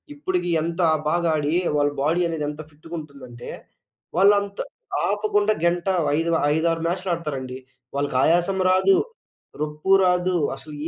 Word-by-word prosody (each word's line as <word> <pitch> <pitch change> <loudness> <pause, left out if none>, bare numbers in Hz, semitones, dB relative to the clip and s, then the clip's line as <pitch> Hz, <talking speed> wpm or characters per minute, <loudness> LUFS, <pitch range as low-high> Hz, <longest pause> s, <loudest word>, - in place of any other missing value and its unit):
ఇప్పటికి 180 - -2
ఎంత 170 +2 -2 0.3
బాగా 170 0 +1
ఆడి 150 +1 -1 0.2
వాళ్ళ 145 0 +3
బాడీ 170 +4 +2
అనేది 155 -3 -2
ఎంత 150 +1 -7
ఫిట్‌గుంటుందంటే, 145 -6 -10 0.7
వాళ్ళంతా 200 +1 +3 0.4
ఆపకుండా 210 +1 +1
గంట 175 +2 0 0.3
ఐదు 165 +1 0 0.3
ఐదారు 165 0 0
మ్యాచ్‌లు 185 +1 -2
ఆడతారండి. 135 -5 -5 0.4
వాళ్ళకి 140 -2 -2
ఆయాసం 175 +4 +2
రాదు. 365 - +4 0.6
రొప్పు 150 +5 -2
రాదు. 180 0 +2 0.2
అసలు 150 +3 -12
170 Hz, 120 wpm, -23 LUFS, 150-185 Hz, 0.7 s, రాదు